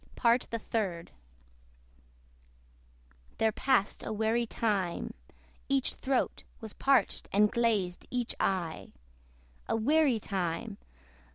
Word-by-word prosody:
PART 235 Hz, +1 st, +3 dB
THE 230 Hz, -, -2 dB
THIRD. 195 Hz, -7 st, -3 dB, 2.3 s
There 220 Hz, 0 st, +3 dB
passed 250 Hz, -3 st, +1 dB
a -, -, -4 dB
weary 220 Hz, +2 st, +1 dB
time. 200 Hz, -7 st, -1 dB, 0.6 s
Each 275 Hz, -1 st, +1 dB
throat 265 Hz, -1 st, -1 dB, 0.2 s
Was 220 Hz, -3 st, -8 dB
parched, 270 Hz, -6 st, +2 dB
and 210 Hz, +1 st, +4 dB
glazed 210 Hz, -7 st, 0 dB
each 245 Hz, -2 st, -2 dB
eye. 175 Hz, -4 st, -1 dB, 0.8 s
A -, -, +2 dB
weary 270 Hz, +1 st, +3 dB
time! 195 Hz, +2 st, -3 dB
220 Hz, 100 wpm, -30 LUFS, 195-240 Hz, 2.3 s, and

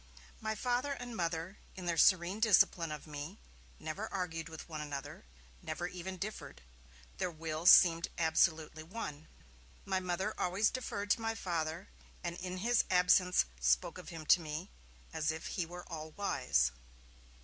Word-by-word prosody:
My 220 Hz, 0 st, -2 dB
Father 250 Hz, +4 st, 0 dB
and 245 Hz, -3 st, -7 dB
Mother, 170 Hz, +1 st, -2 dB, 0.2 s
in 185 Hz, -, -7 dB
their 170 Hz, -1 st, +1 dB
serene 185 Hz, +3 st, +4 dB
discipline 185 Hz, -6 st, +4 dB
of 150 Hz, -1 st, -6 dB
me, 145 Hz, -1 st, -7 dB, 0.4 s
never -, -, -5 dB
argued 165 Hz, -4 st, -3 dB
with 160 Hz, -1 st, -9 dB
one 155 Hz, -2 st, -5 dB
another, 145 Hz, -, -6 dB, 0.4 s
never 175 Hz, -, -4 dB
even 180 Hz, +1 st, -6 dB
differed; 210 Hz, -, -6 dB, 0.6 s
their 180 Hz, -, 0 dB
wills 160 Hz, +1 st, +1 dB
seemed 170 Hz, -2 st, +7 dB
absolutely 160 Hz, -1 st, +2 dB
one. 155 Hz, -4 st, -6 dB, 0.6 s
My 190 Hz, -1 st, +1 dB
Mother 185 Hz, +3 st, -2 dB
always 190 Hz, +4 st, +2 dB
deferred 205 Hz, -5 st, -3 dB
to -, -, +3 dB
my 225 Hz, 0 st, -1 dB
Father, 170 Hz, -1 st, -3 dB, 0.4 s
and 170 Hz, -1 st, -3 dB
in 185 Hz, 0 st, -5 dB
his 240 Hz, -1 st, +4 dB
absence 180 Hz, 0 st, +4 dB
spoke 60 Hz, -, +2 dB
of -, -, -9 dB
him 165 Hz, -2 st, -8 dB
to 175 Hz, -, +6 dB
me, 160 Hz, +4 st, -5 dB, 0.4 s
as 155 Hz, -1 st, 0 dB
if 160 Hz, 0 st, -6 dB
he 175 Hz, -4 st, -2 dB
were 175 Hz, +1 st, -9 dB
all 160 Hz, -2 st, -6 dB
wise. 125 Hz, -, +1 dB
175 Hz, 155 wpm, -34 LUFS, 160-190 Hz, 0.6 s, seemed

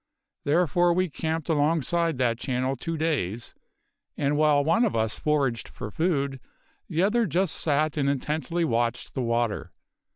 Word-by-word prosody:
Therefore 175 Hz, +3 st, +3 dB
we 185 Hz, -1 st, 0 dB
camped 160 Hz, 0 st, -3 dB
alongside 165 Hz, +1 st, +1 dB
that 120 Hz, -2 st, +1 dB
channel 130 Hz, +1 st, -1 dB
two 165 Hz, +5 st, -4 dB
days, 120 Hz, -, -2 dB, 0.6 s
and 145 Hz, +1 st, +1 dB
while 150 Hz, -1 st, +4 dB
one 190 Hz, +11 st, +3 dB
of 225 Hz, -, +1 dB
us 110 Hz, -1 st, 0 dB
foraged 140 Hz, -6 st, 0 dB
for 105 Hz, -, -7 dB
food, 140 Hz, -, 0 dB, 0.5 s
the 170 Hz, 0 st, +1 dB
other 225 Hz, +3 st, +2 dB
just 180 Hz, +2 st, +1 dB
sat 155 Hz, 0 st, 0 dB
and 140 Hz, -1 st, +2 dB
intently 155 Hz, +5 st, -1 dB
watched 120 Hz, -3 st, -1 dB
the 130 Hz, -, -2 dB
water. 115 Hz, -2 st, -1 dB
150 Hz, 150 wpm, -26 LUFS, 130-165 Hz, 0.6 s, while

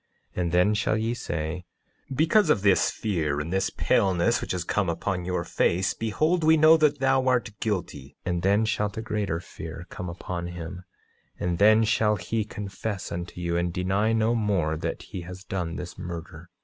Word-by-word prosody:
9:34 -, -, -1 dB
And 85 Hz, -1 st, -1 dB
then 90 Hz, +4 st, +4 dB
shall 110 Hz, +1 st, +1 dB
ye 110 Hz, +2 st, 0 dB
say: 85 Hz, -5 st, -4 dB, 0.5 s
Because 160 Hz, -, +3 dB
of 110 Hz, -10 st, +3 dB
this 100 Hz, -2 st, +4 dB
fear 80 Hz, -9 st, -1 dB
and 80 Hz, +4 st, -4 dB
this 95 Hz, 0 st, +1 dB
paleness 95 Hz, +5 st, +2 dB
which -, -, -4 dB
has 90 Hz, -2 st, -1 dB
come 95 Hz, +1 st, 0 dB
upon 90 Hz, +2 st, -2 dB
your 90 Hz, 0 st, -1 dB
face, 95 Hz, +3 st, +1 dB
behold, 155 Hz, +11 st, 0 dB
we 160 Hz, +1 st, +6 dB
know 155 Hz, +1 st, +7 dB
that 150 Hz, -2 st, +3 dB
thou 135 Hz, 0 st, +2 dB
art 125 Hz, -5 st, +2 dB
guilty. 75 Hz, -10 st, -3 dB
9:35 90 Hz, -, 0 dB
And 85 Hz, -1 st, -1 dB
then 100 Hz, +4 st, +3 dB
shall 105 Hz, -1 st, 0 dB
greater 105 Hz, -5 st, -2 dB
fear 85 Hz, -1 st, -8 dB
come 90 Hz, -, -5 dB
upon 85 Hz, 0 st, -5 dB
him; 90 Hz, +1 st, -7 dB, 0.5 s
and 85 Hz, -1 st, -1 dB
then 110 Hz, +2 st, +6 dB
shall 105 Hz, -1 st, +2 dB
he 110 Hz, +3 st, -2 dB
confess 105 Hz, -1 st, -5 dB
unto 85 Hz, +1 st, -5 dB
you, 85 Hz, -1 st, -1 dB
and 85 Hz, 0 st, 0 dB
deny 95 Hz, +4 st, +1 dB
no 115 Hz, +1 st, +2 dB
more 100 Hz, -9 st, +1 dB
that 80 Hz, -, -4 dB
he 90 Hz, -, -7 dB
has 90 Hz, +2 st, -9 dB
done 90 Hz, -4 st, -3 dB
this 90 Hz, -, -7 dB
murder. 85 Hz, 0 st, -7 dB
95 Hz, 190 wpm, -26 LUFS, 85-110 Hz, 0.5 s, know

